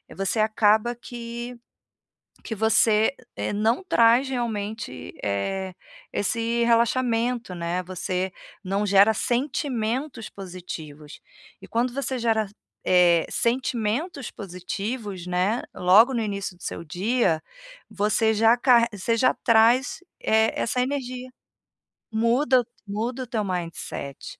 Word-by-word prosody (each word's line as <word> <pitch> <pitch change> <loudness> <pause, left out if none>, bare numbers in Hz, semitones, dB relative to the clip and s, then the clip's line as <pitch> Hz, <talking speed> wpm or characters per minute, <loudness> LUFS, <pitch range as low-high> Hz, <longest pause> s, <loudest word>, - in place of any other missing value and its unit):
você 195 +3 -1
acaba 215 +1 +3
que 240 0 -7 0.9
que - - -4
você, 220 +2 +3 0.2
eh, - - -2
não 220 - +1
traz 240 -5 +4
realmente, 220 - -4
eh, 185 - -2 0.4
esse 230 +3 0
relaxamento, 235 -2 +1
né, 170 +1 -2
você 185 +1 -3 0.3
não 195 +2 -1
gera 200 +2 +5
sentimentos 255 -1 -2
positivos 165 -6 -9 0.4
e - - -11
quando 240 +2 0
você 265 0 -3
gera, 225 -2 +1 0.4
eh, 175 -2 +5
sentimentos 250 - -1
positivos, 195 +1 -5
né, 180 +6 0
logo 210 +8 +5
no 235 - 0
início 200 -3 -3
do 175 - -24
seu - - -5
dia, 180 0 0 0.5
você 215 +2 +1
já 225 +2 +4
car 240 -2 +5
você 215 +3 -1
já 255 - +4
traz, 235 +8 +3 0.2
eh, 220 0 +3
essa 250 +2 0
energia, 255 -1 -3 0.8
muda 240 +3 +3 0.2
muda 230 +6 -3
o - - -9
teu 225 -3 -1
mindset. 170 -6 -5
220 Hz, 115 wpm, -25 LUFS, 195-240 Hz, 0.9 s, gera